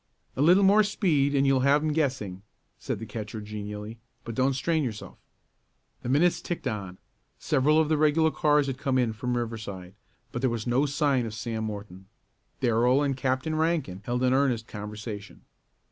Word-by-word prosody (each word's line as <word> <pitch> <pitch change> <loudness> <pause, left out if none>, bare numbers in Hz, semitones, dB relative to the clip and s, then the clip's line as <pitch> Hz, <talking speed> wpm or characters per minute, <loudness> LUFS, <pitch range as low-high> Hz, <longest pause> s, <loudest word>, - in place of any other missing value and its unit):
"A - - -1
little 180 +6 +6
more 200 +2 +6
speed 155 -9 +1
and 140 0 +3
you'll 135 -1 +3
have 140 +3 +3
'em 155 -1 0
guessing," 130 - -1 0.4
said - - -3
the 115 - -7
catcher 110 -1 -6
genially. 105 +1 -7 0.2
"But 115 - -6
don't 130 +3 +2
strain 160 +4 0
yourself." 110 -5 -6 0.9
The - - -5
minutes 170 +5 +3
ticked 175 -3 -5
on. 100 -6 -4 0.4
Several 150 +4 +2
of 160 - +3
the 155 0 +2
regular 155 +1 +3
cars 150 -2 +3
had 135 -2 -4
come 135 -2 0
in 120 -3 +1
from 125 +2 -2
Riverside 105 -6 -5 0.4
but 120 - -4
there 130 - +2
was 115 -2 -3
no 130 +4 +2
sign 140 -4 +1
of 110 - -7
Sam 115 -1 -3
Morton. 100 -3 -7 0.5
Darrell 125 +3 +3
and 140 -2 0
Captain 130 +3 -1
Rankin 155 - -1
held 125 +1 -1
an 130 0 +3
earnest 130 -4 +1
conversation. 105 0 -8
130 Hz, 175 wpm, -27 LUFS, 110-145 Hz, 0.9 s, little